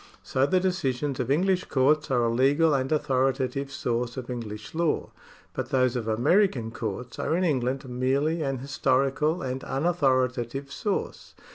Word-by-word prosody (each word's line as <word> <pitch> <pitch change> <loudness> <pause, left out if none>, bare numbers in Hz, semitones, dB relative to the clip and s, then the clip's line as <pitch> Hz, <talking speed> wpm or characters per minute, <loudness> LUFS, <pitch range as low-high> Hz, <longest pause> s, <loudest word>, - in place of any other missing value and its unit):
80 135 +1 +4
the 185 +3 +3
decisions 150 -7 -1
of - - -2
English 185 +5 +2
courts 150 +3 +2
are 125 -3 +2
a 115 - +2
legal 145 +6 +3
and 135 -1 0
authorita 135 -3 +1
tive 140 0 -4
source 120 -3 -2
of 125 -1 -5
English 110 -3 -6
law, 165 -1 0 0.4
but - - -4
those 130 -1 +2
of 115 -3 -3
American 120 - +2
comts 115 +2 -5
are - - 0
in 185 - +1
England 135 -4 0
merely 135 +6 0
an 135 -2 -1
historical 140 +4 0
and 130 0 -3
unauthoritative 135 -4 0
source. 205 +5 -3
135 Hz, 155 wpm, -26 LUFS, 125-155 Hz, 0.4 s, 80